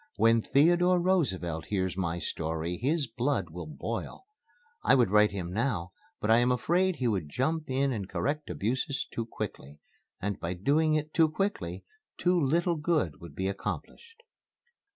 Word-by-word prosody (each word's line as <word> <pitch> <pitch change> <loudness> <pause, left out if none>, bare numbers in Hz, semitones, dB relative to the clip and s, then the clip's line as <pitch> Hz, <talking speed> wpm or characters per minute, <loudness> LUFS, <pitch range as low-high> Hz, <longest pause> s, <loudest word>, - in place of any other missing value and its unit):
When 115 0 +4
Theodore 175 +8 +4
Roosevelt 95 - 0
hears 95 -3 -1
my 85 -3 -1
story 80 +1 -3
his 145 +5 +1
blood 115 - -1
will 85 -1 -7
boil. 110 - -5 0.6
I - - +5
would 120 -7 +3
write 105 0 +6
to - - -9
him 90 -2 -4
now, 100 -6 -1 0.3
but 105 - +1
I 115 - +7
am 120 +1 +3
afraid 175 +9 +2
he 125 - -1
would 95 -9 -1
jump 155 - -1
in 135 +1 +1
and 100 -6 -4
correct 145 - -2
abuses 130 +6 -1
too 115 -1 -3
quickly. 75 - -6 0.4
And 100 0 -3
by 85 +2 -3
doing 155 - +2
it 155 0 -2
too 160 -2 +4
quickly 150 - -2 0.3
too 180 0 +2
little 170 +4 +2
good 150 - 0
would 85 -4 -10
be 95 +3 -1
accomplished." 455 - -6
115 Hz, 165 wpm, -29 LUFS, 90-155 Hz, 0.6 s, I